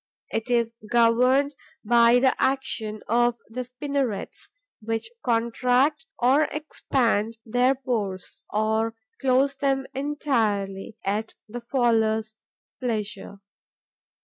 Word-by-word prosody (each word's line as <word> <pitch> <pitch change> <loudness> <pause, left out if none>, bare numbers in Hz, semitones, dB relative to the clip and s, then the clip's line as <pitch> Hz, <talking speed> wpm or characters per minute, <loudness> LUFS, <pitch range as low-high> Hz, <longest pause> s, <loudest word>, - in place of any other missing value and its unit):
It 225 +2 -2
is 235 -2 +1 0.2
governed 250 +5 +3 0.3
by 235 +1 +6
the 260 +1 +4
action 235 -5 -1
of 240 +1 +2
the 250 +3 -4
spinnerets, 255 -3 -3 0.3
which 225 - -3
contract 250 +6 +1
or 270 +5 +4
expand 235 -7 -1
their 245 +3 +2
pores, 220 -8 -4
or 220 +1 0 0.2
close 270 +1 +3
them 270 -1 0
entirely, 225 -8 -1
at 210 +3 -2
the 240 +3 -7
faller's 225 -3 +1 0.5
pleasure. 215 -4 -4
240 Hz, 95 wpm, -25 LUFS, 220-265 Hz, 0.5 s, by